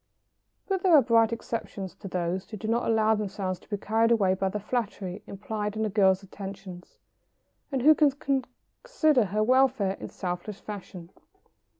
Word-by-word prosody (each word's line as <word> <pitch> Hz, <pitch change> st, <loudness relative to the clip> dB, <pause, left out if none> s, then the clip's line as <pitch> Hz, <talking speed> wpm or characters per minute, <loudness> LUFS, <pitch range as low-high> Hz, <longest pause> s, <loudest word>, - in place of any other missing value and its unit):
] -, -, -49 dB
But 385 Hz, -2 st, -1 dB
there 365 Hz, -3 st, +5 dB
are 290 Hz, -, +8 dB
bright 230 Hz, -1 st, +4 dB
exceptions 220 Hz, -5 st, -5 dB
to -, -, -9 dB
these 180 Hz, 0 st, -3 dB
who 215 Hz, -, -7 dB
do 215 Hz, -, -6 dB
not 230 Hz, +2 st, 0 dB
allow 220 Hz, -1 st, +3 dB
themselves 195 Hz, -3 st, -3 dB
to -, -, -23 dB
be 205 Hz, -, -2 dB
carried 225 Hz, +3 st, +1 dB
away 205 Hz, -5 st, +3 dB
by 190 Hz, 0 st, -1 dB
the 210 Hz, -, -3 dB
flattery 205 Hz, -4 st, -3 dB
implied 210 Hz, +1 st, -4 dB
in 220 Hz, 0 st, 0 dB
a 210 Hz, -, -2 dB
girl's 190 Hz, -2 st, +3 dB
attentions, 195 Hz, -2 st, -9 dB, 0.7 s
and 265 Hz, -3 st, -1 dB
who 310 Hz, +2 st, +8 dB
can 295 Hz, -2 st, +4 dB, 0.7 s
consider 310 Hz, -, +2 dB
her 210 Hz, +3 st, 0 dB
welfare 255 Hz, -5 st, +3 dB
in -, -, -7 dB
selfless 180 Hz, +3 st, -5 dB
fashion. 185 Hz, -4 st, -9 dB
210 Hz, 175 wpm, -27 LUFS, 190-230 Hz, 0.7 s, are